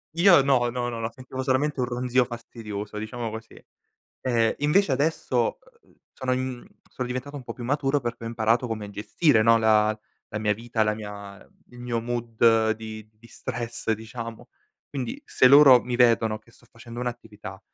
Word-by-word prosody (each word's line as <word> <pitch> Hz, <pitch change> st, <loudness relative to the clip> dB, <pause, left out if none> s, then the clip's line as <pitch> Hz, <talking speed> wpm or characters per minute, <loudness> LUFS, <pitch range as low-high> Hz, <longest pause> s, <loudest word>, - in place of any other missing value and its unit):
Io 175 Hz, -3 st, +7 dB
no, 130 Hz, -3 st, +2 dB
no, 120 Hz, 0 st, -2 dB
no, 115 Hz, -, -5 dB
no, 115 Hz, 0 st, -3 dB
sentivo 130 Hz, +1 st, -7 dB
solamente 135 Hz, +2 st, 0 dB
un 125 Hz, -, +2 dB
ronzio 125 Hz, 0 st, +1 dB
fastidioso, 110 Hz, -3 st, -7 dB
diciamo 115 Hz, +2 st, -4 dB
così. 110 Hz, +1 st, -10 dB, 0.6 s
Ehm, 115 Hz, -3 st, +2 dB
invece 150 Hz, +2 st, +2 dB
adesso, 160 Hz, -, 0 dB, 0.2 s
uhm, -, -, -28 dB, 0.2 s
sono 130 Hz, -1 st, -1 dB
mhmm, 130 Hz, -1 st, -4 dB, 0.2 s
sono 125 Hz, -, -4 dB
diventato 130 Hz, +3 st, -5 dB
un 135 Hz, -, -7 dB
po' 115 Hz, -1 st, -7 dB
più 120 Hz, -, -8 dB
maturo 140 Hz, +2 st, +1 dB
perché 120 Hz, -1 st, -5 dB
ho -, -, -5 dB
imparato 115 Hz, +1 st, +1 dB
come 110 Hz, -3 st, -5 dB
gestire, 110 Hz, +4 st, +2 dB
no, 115 Hz, +1 st, +5 dB
la 110 Hz, -1 st, +3 dB, 0.3 s
la 105 Hz, -, -2 dB
mia 105 Hz, -1 st, +1 dB
vita, 115 Hz, 0 st, -2 dB
la 105 Hz, -, +1 dB
mia 100 Hz, -2 st, -8 dB, 0.3 s
il 120 Hz, 0 st, -13 dB
mio 120 Hz, -1 st, -2 dB
mood 115 Hz, -1 st, +2 dB
di 110 Hz, -1 st, -9 dB
di 110 Hz, +2 st, -20 dB
stress 120 Hz, -2 st, -5 dB
diciamo. 115 Hz, +1 st, -7 dB, 0.4 s
Quindi 130 Hz, -5 st, -4 dB
se 130 Hz, -, +3 dB
loro 140 Hz, -2 st, +8 dB
mi 125 Hz, -1 st, -3 dB
vedono 115 Hz, -3 st, +3 dB
che 110 Hz, -, -24 dB
sto -, -, -23 dB
facendo 115 Hz, +1 st, -10 dB
un'attività, 105 Hz, -5 st, -7 dB
120 Hz, 175 wpm, -25 LUFS, 110-130 Hz, 0.6 s, loro